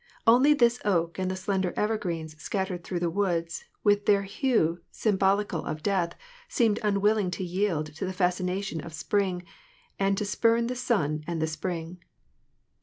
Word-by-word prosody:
Only 255 +6 +6
this 240 -2 +3
oak 170 -4 0
and 185 0 0
the 185 - -2
slender 190 -1 -1
evergreens 175 -8 -2
scattered 190 -1 -2
through 175 -1 -3
the 175 - +1
woods, 170 -3 -1 0.2
with 205 -1 +3
their 200 -1 +4
hue 195 - +1
sym 215 -3 0
bolical 195 -3 +1
of 155 0 -5
death, 190 -4 0 0.3
seemed 225 - +2
unwilling 210 -1 +2
to 185 - -4
yield 175 -4 -1
to 190 - -2
the - - -2
fascination 180 -1 -1
of 170 -2 -9
the - - -7
spring, 190 -2 0 0.6
and 195 0 +2
to 210 - -1
spurn 230 +3 +2
the 250 +2 -2
sun 155 - 0
and 170 -1 -2
the 160 - +1
spring. 165 +1 -4
190 Hz, 170 wpm, -27 LUFS, 170-210 Hz, 0.6 s, Only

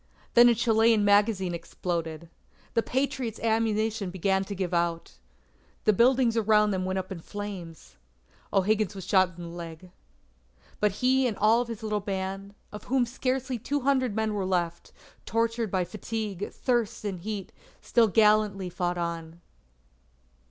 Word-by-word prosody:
Then 240 0 +8
a 235 - +4
Chilean 225 -1 +3
magazine 205 -3 +3
exploded. 170 -1 -4 0.5
The 230 - +3
Patriots' 255 -3 -2
ammunition 220 -2 0
began 190 +1 0
to 200 - -6
give 185 -2 -3
out. 170 -1 -1 0.6
The 215 - +4
buildings 240 +2 +3
around 210 -1 +3
them 185 -1 -1
went 185 0 -1
up 190 0 -4
in 185 - -5
flames. 190 -3 -8 0.5
O'Higgins 205 +1 +1
was 190 - -7
shot 185 -3 +2
in 175 - -7
the 170 - -7
leg. 170 +1 -9 0.9
But 210 -2 +2
he 260 0 +4
and 220 - -3
all 220 +3 +4
of 245 - -4
his 230 -2 -7
little 210 -1 -1
band, 195 0 -4 0.2
of 210 0 -9
whom 260 -1 +2
scarcely 255 +1 -2
two 285 +5 -2
hundred 260 -4 +1
men 220 -1 0
were 200 -2 -1
left, 175 -2 -2 0.4
tortured 230 0 0
by 185 -1 0
fatigue, 210 0 -5
thirst, 235 -4 -1
and 195 -3 -3
heat, 200 0 -5 0.3
still 230 -2 +3
gallantly 210 -3 +3
fought 175 0 -2
on. 170 -1 -4
205 Hz, 150 wpm, -27 LUFS, 185-225 Hz, 0.9 s, Then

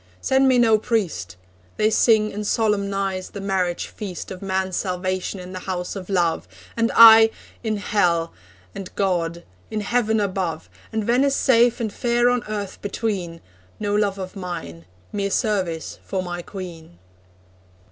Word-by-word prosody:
Send 265 - +3
me 260 -1 +4
no 225 -3 +5
priest! 190 - -2 0.4
They 215 +1 +3
sing 215 -2 +3
and 210 0 -4
solemnise 200 -4 0
the 200 - -8
marriage 190 -3 -1
feast 195 -5 -7
Of 185 - -7
man's 190 -1 -1
salvation 185 0 -2
in 180 +1 -9
the 185 - -5
house 180 0 -3
of 190 -1 -7
love, 175 -4 +1 0.3
And 230 0 +1
I 225 -1 +10 0.3
in 215 -2 -1
Hell, 175 -5 +1 0.4
and 190 -1 -7
God 170 -3 -1 0.3
in 215 - -2
Heaven 220 0 +1
above, 185 - -2 0.2
And 220 -1 -1
Venice 260 +5 +2
safe 240 -1 +4
and 220 -3 -3
fair 240 0 +2
on 245 -2 0
earth 205 -2 -5
between 195 -5 -3 0.4
No 205 -1 -1
love 205 -1 +1
of 185 0 -7
mine 85 - -6 0.3
mere 200 -1 -1
service 190 -7 -1
for 190 -1 -3
my 175 -1 -5
Queen.' 170 - -9
200 Hz, 150 wpm, -22 LUFS, 180-220 Hz, 0.4 s, I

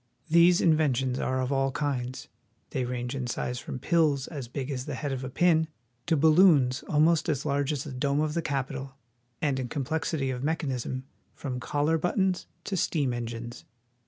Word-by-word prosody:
These 170 +1 +6
inventions 135 -6 +2
are 130 0 0
of 130 +1 -1
all 135 0 +1
kinds. 130 -3 -3 0.4
They 130 - -1
range 125 0 -3
in 130 -3 -3
size 125 +1 -3
from - - -6
pills 145 -1 +2
as 140 -6 -6
big 135 +3 -4
as 130 -1 -3
the 145 - -3
head 145 +1 -3
of 130 -1 -3
a 130 - -4
pin 160 +2 +3 0.4
to 160 - +3
balloons 155 -4 +5
almost 160 +2 +3
as 145 -2 -1
large 140 0 +1
as 145 -3 -2
the 150 - -7
dome 140 +2 0
of 155 -1 0
the 170 - 0
Capitol, 135 -2 -3 0.5
and 140 -3 +1
in 130 - -2
complexity 145 0 -1
of 125 -1 -4
mechan 155 -1 -1
ism 130 +1 -3 0.3
from 125 -3 -4
collar 145 +5 +1
buttons 185 +2 0 0.2
to 195 - -3
steam 145 -7 +1
engines. 120 0 -5
140 Hz, 185 wpm, -28 LUFS, 130-155 Hz, 0.5 s, These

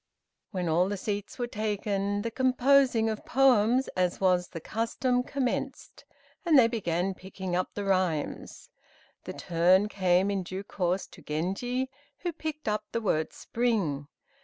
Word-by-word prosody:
When 180 -4 -3
all 175 +4 +2
the 205 - -2
seats 205 +1 -4
were 245 - -1
taken 205 -2 -2
the 230 - -3
composing 260 -1 +3
of 220 -1 -3
poems, 255 -1 +4
as 180 -1 -1
was 180 -2 +2
the 165 - -7
custom, 240 - 0
commenced, 255 0 -3 0.4
and 330 -4 +5
they 240 -3 +7
began 190 -5 -1
picking 190 -1 -5
up 185 - -2
the 205 - -3
rhymes. 185 -6 -1 0.5
The - - -5
turn 180 +4 +3
came 185 0 +2
in 195 -1 -1
due 185 +2 -6
course 185 -1 -1
to - - -15
Genji, 195 - -2 0.3
who 350 -2 -3
picked 310 -2 -6
up 210 0 0
the 230 - -1
word 155 -7 0
spring. 195 - -1
205 Hz, 150 wpm, -28 LUFS, 185-245 Hz, 0.5 s, they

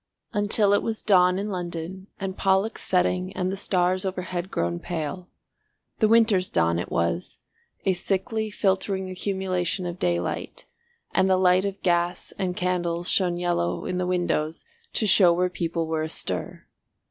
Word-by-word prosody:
Until 205 -1 +3
it 205 - +3
was 225 -1 -3
dawn 180 -3 +4
in 205 +2 -3
London 180 +1 -5
and 195 -2 -4
Pollux 195 +3 +1
setting 180 0 +1
and 185 0 0
the - - -2
stars 185 -1 +1
overhead 185 -1 -3
grown 85 - -1
pale. 175 - -5 0.7
The 220 - +4
Winter's 220 -4 +4
dawn 85 0 +2
it - - -4
was, 85 +1 -1 0.5
a 190 - +3
sickly 205 +4 -2
filtering 190 -1 0
accumulation 185 -1 -1
of 175 0 -5
daylight, 85 0 -2 0.5
and 190 0 +2
the 185 - +4
light 185 +1 +4
of 200 0 -4
gas 175 0 0
and 180 -2 -2
candles 175 -1 0
shone 180 -3 +2
yellow 175 - -1
in 180 0 -2
the 180 - -1
windows 175 -3 -1 0.3
to 220 - +1
show 190 -3 +6
where 180 +1 +1
people 170 -2 -2
were 160 0 -1
astir. 155 0 -4
180 Hz, 155 wpm, -25 LUFS, 175-190 Hz, 0.7 s, show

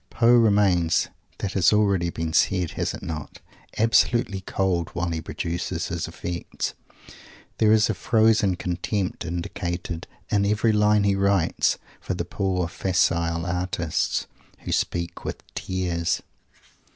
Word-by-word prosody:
Poe 120 0 +4
remains 100 -7 +4 0.3
that 100 - -3
has 95 -3 +4
been 105 - +4
already 95 -5 +2 0.2
said, 90 0 +2
has - - -2
it - - -10
not? 75 -3 -6 0.4
absolutely 115 -2 +2
cold 95 -2 -1
while 85 0 -1
he 80 -1 -2
produces 85 +1 -3
his 85 0 -3
effects. 85 +1 -4 0.9
There 110 -1 +5
is 110 0 +5
a 110 - 0
frozen 110 -2 +3
contempt 90 +2 -2
indicated 85 0 -4 0.2
in 100 -1 +3
every 105 +2 +2
line 105 0 +4
he 100 -1 +3
writes 95 -3 +2 0.2
for - - -3
the - - -3
poor 90 -3 -1
facile 85 -2 0
artists 90 -2 -1 0.4
"who - - -5
speak 85 0 -1
with - - -5
tears." 90 -2 -1
90 Hz, 130 wpm, -24 LUFS, 85-105 Hz, 0.9 s, There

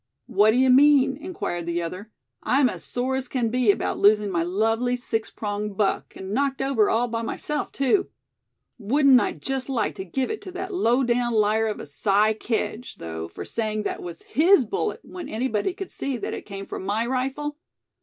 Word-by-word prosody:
"What 210 +1 +4
do 220 - +3
you 260 0 +5
mean?" 275 0 +6
inquired 285 - -5
the 170 0 -1
other. 185 +6 -7 0.3
"I'm 265 -1 +3
as - - -7
sore 255 +2 -2
as 260 -1 -3
can 245 -3 -1
be 245 -1 +1
about 200 - +1
losing 210 0 +4
my 170 -2 +1
lovely 225 +7 +1
six 225 -3 -3
pronged 205 -1 -4
buck, 205 -2 0
and 190 +1 -6
knocked 275 +2 0
over 270 -6 +2
all 235 +2 +2
by 230 -1 -3
myself, 295 +6 -3
too. 275 +9 +1 0.7
Wouldn't 265 +4 +5
I - - -1
just 270 0 -4
like 235 -6 0
to 190 - -4
give 255 +8 -2
it 435 - -5
to 370 - -8
that 380 +1 -5
low 260 -7 +2
down 240 -1 +1
liar 215 +1 +2
of 215 - -3
a - - -7
Si 205 +8 +2
Kedge, 225 +2 -3
though, 80 0 -6
for - - -8
saying 215 -2 -2
that - - -3
was 170 -1 -8
his 325 -2 +4
bullet, - - -2
when 365 -1 -8
anybody 230 - -1
could 385 +1 -7
see 275 -2 -3
that - - -4
it - - -7
came 195 -1 -6
from - - -6
my 210 +4 0
rifle? 270 +4 -2
235 Hz, 200 wpm, -24 LUFS, 210-270 Hz, 0.7 s, mean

